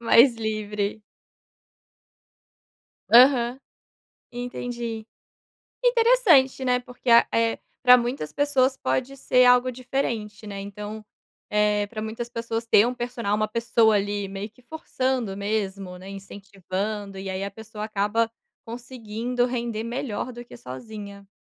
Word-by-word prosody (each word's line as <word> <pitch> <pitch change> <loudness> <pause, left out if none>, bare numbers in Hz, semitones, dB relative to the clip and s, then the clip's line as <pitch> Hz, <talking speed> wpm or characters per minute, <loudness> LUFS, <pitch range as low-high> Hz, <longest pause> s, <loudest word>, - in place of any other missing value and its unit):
Mais 235 +2 +6
livre. 215 -1 -3 2.1
Aham, 250 0 +6 0.7
entendi, 240 -2 -5 0.8
interessante, 455 - +4
né, 250 -1 +2
porque 250 0 -7
a 235 0 +7
eh, 230 0 +1 0.2
para 250 0 +9
muitas 240 - -3
pessoas 270 -2 +2
pode 245 - -2
ser 250 -1 +3
algo 250 +1 +5
diferente, 235 -4 -3
né, 200 -1 -6
então, 210 +2 -7 0.5
eh, 210 -1 +2
para 215 0 -8
muitas 225 +2 -5
pessoas 230 -1 -3
ter 215 -1 +6
um 245 - -1
personal 240 -4 -2
uma 215 0 0
pessoa 230 0 +3
ali 205 0 -1
meio 195 +2 -6
que 250 - -23
forçando 255 -7 -2
mesmo, 200 -2 -3
né, 185 +1 -12
incentivando 200 +1 -5
e 195 0 -6
aí 190 +1 -3
a 200 - -3
pessoa 215 +1 -8
acaba 215 +2 0 0.3
conseguindo 240 0 -3
render 235 -3 -3
melhor 245 -1 -4
do 240 0 -10
que - - -13
sozinha. 200 - -9
225 Hz, 125 wpm, -25 LUFS, 205-245 Hz, 2.1 s, para